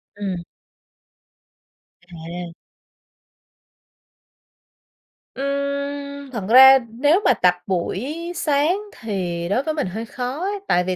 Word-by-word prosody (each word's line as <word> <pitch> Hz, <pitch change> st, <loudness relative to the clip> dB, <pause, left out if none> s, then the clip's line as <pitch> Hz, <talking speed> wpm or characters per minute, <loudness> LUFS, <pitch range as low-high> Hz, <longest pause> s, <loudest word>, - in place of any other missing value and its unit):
Ừm. 190 Hz, -4 st, -4 dB, 1.7 s
À. 170 Hz, +1 st, -7 dB, 2.8 s
Ừm, 280 Hz, 0 st, -3 dB
thật 230 Hz, -6 st, -4 dB
ra 265 Hz, +2 st, +9 dB
nếu 290 Hz, -, +2 dB
mà 255 Hz, -, +6 dB
tập 180 Hz, -5 st, +3 dB
buổi 200 Hz, -, -2 dB, 0.2 s
sáng 305 Hz, +4 st, +1 dB, 0.2 s
thì 180 Hz, -6 st, -3 dB
đối 250 Hz, +7 st, +1 dB
với 315 Hz, -, -2 dB
mình 300 Hz, -11 st, -2 dB
hơi 220 Hz, +5 st, -5 dB
khó 250 Hz, +5 st, -5 dB
ấy, 400 Hz, +3 st, -2 dB
tại 180 Hz, -, +3 dB
vì 185 Hz, 0 st, -2 dB
255 Hz, 105 wpm, -21 LUFS, 185-280 Hz, 2.8 s, ra